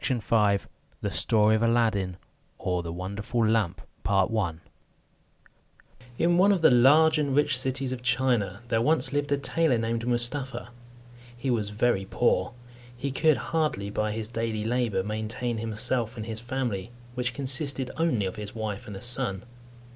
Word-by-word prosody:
CHAPTER 110 -4 +2
V - - -20 0.4
THE - - -2
STORY 110 0 +3
OF - - -3
ALADDIN; 110 -6 +1 0.4
OR, 90 -1 -1
THE 85 -1 -6
WONDERFUL 100 +6 -2
LAMP 105 -4 +1 2.4
In 175 +1 +3
one 200 +2 +6
of 185 -5 +1
the - - +7
large 155 +6 +6
and 140 -3 0
rich 145 -1 +3
cities 130 +1 0
of 130 -1 -4
China, 120 -6 +1
there 115 -2 +2
once 155 +3 +2
lived 145 0 -1
a 145 - +3
tailor 145 -1 +1
named 115 +1 -2
Mustapha. 125 +1 -1 0.7
He 130 +2 -1
was 110 -4 0
very 105 -2 0
poor. 120 0 +1 0.4
He 140 +2 -3
could 155 +1 +3
hardly, 115 -7 -1
by 105 +1 -1
his 110 0 -4
daily 115 -2 -3
labour, 115 -5 0
maintain 110 +3 -3
himself 115 +1 -2
and 110 - -5
his 110 -1 -3
family, 120 -4 -3 0.2
which 125 -1 -2
consisted 135 -1 -1
only 155 -11 +1
of 95 - -4
his 105 0 -7
wife 110 -2 -4
and 105 - -7
a 95 - -8
son. 120 -6 +2
120 Hz, 155 wpm, -27 LUFS, 105-130 Hz, 2.4 s, the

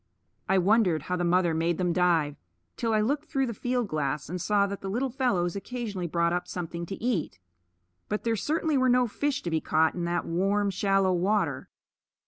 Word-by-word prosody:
I 190 - +4
wondered 185 -5 +3
how 180 - -2
the 175 - -1
mother 175 -1 +2
made 165 +1 0
them 180 -2 0
dive, 165 -5 +2 0.4
till 230 -1 -1
I 215 -1 +3
looked 285 +7 0
through 270 -4 0
the 235 - -3
field 245 +1 -1
glass 150 -2 -2
and 180 +1 -4
saw 200 +2 +2
that 200 0 -5
the 195 - -4
little 250 +6 -1
fellows 200 -10 0
occasionally 205 -4 -4
brought 170 +1 +1
up 180 0 -2
something 170 -1 -5
to 195 - -4
eat. 205 - -2 0.7
But 210 - -2
there 230 -1 +1
certainly 305 +4 0
were 255 0 +3
no 250 0 +4
fish 285 +5 -2
to 170 - -3
be 160 -1 +1
caught 160 0 +2
in 175 -1 -3
that 175 0 -1
warm, 195 +4 +1
shallow 195 0 +2
water. 180 -6 0
190 Hz, 200 wpm, -27 LUFS, 170-225 Hz, 0.7 s, I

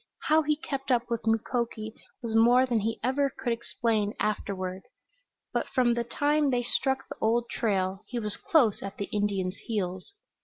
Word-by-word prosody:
How 310 +1 +4
he 300 0 +1
kept 275 -2 -5
up 240 -1 +1
with 230 -1 -2
Mukoki 225 -1 -1 0.3
was 230 -2 -3
more 240 +3 +6
than 240 -3 +1
he 225 +2 -2
ever 275 +3 +2
could 245 -3 -2
explain 225 -2 -1
afterward. 190 -3 -2 0.7
But - - 0
from 245 -2 +2
the 235 0 0
time 290 +4 +1
they 245 -2 +1
struck 265 +2 0
the - - -8
old 235 +2 +2
trail 190 -3 0
he 245 - -4
was 210 -3 -2
close 250 -11 +3
at 195 0 -6
the 200 - -2
Indian's 200 -3 -1
heels. 190 - -3
230 Hz, 175 wpm, -28 LUFS, 205-255 Hz, 0.7 s, more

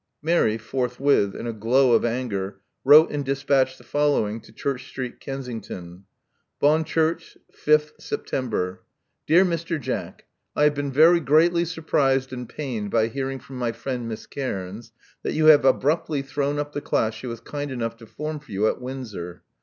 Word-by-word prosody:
Mary 155 -9 +2
forthwith, 125 -2 +1
in - - -6
a 115 - -3
glow 120 +4 +3
of - - +4
anger, 105 -5 -2 0.2
wrote 150 +4 +8
and 145 -1 -2
despatched 135 -1 +1
the - - -17
following 145 -7 +1
to 110 - -17
Church 130 +3 -4
Street, 130 -2 -6
Kensington. 110 -9 -7 0.5
*'Bonchurch, 160 +2 +1 0.2
5th 150 0 +2
September. 95 -8 -3 0.5
'*Dear 175 +4 +6
Mr. 170 -2 -2
Jack: 130 - -5
— - - -54
I 150 - +2
have 150 0 +5
been 140 -1 -3
very 165 +5 +6
greatly 170 +4 +3
surprised 135 -5 0
and 125 -2 -6
pained 120 -9 -4
by 110 +1 +2
hearing 135 +2 -3
from 130 0 -11
my 120 -2 0
friend 120 +1 -4
Miss 110 - -6
Cairns 110 -3 -5 0.3
tHat - - -2
you 155 - +2
have 150 -3 +7
abruptly 145 +2 +2
thrown 145 +1 -1
up 145 0 -3
the 145 - -3
class 110 -4 0
she 110 +4 -8
was 115 -1 -5
kind 145 0 -5
enough 115 -3 -3
to 115 -1 -14
form 150 +5 -5
for 145 -6 -18
you 100 +2 +1
at - - -1
Windsor. 115 -10 -7
135 Hz, 170 wpm, -24 LUFS, 115-150 Hz, 0.5 s, wrote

